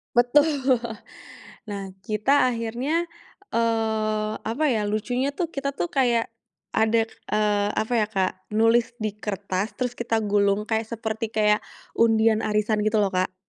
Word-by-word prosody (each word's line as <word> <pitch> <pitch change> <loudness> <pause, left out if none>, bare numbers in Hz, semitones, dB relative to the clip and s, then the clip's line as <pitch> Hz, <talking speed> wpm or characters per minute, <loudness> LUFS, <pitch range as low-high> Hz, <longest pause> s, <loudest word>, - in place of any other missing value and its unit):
Betul, 245 +5 +5 1.2
nah, 200 -2 -5
kita 215 +8 +2
akhirnya, 245 +8 -1 0.5
eee, 220 -2 0
apa 230 +8 -3
ya, 215 -3 0
lucunya 245 +6 -1
tuh 335 0 -2
kita 275 0 -3
tuh 345 - -2
kayak 240 -4 +1 0.4
ada, 225 +1 +3
eee, 210 -2 -1
apa 220 +3 -1
ya 210 - +1
Kak, 190 -3 0 0.2
nulis 230 +2 +3
di 215 -2 -3
kertas 200 0 -3
terus 250 -2 -1
kita 230 -2 -1
gulung 205 0 +2
kayak 220 0 -1
seperti 225 0 -3
kayak 210 -1 +4 0.4
undian 225 -1 +4
arisan, 215 0 0
gitu 215 +1 +1
loh, 195 - 0
Kak. 185 0 -1
220 Hz, 140 wpm, -24 LUFS, 210-235 Hz, 1.2 s, Betul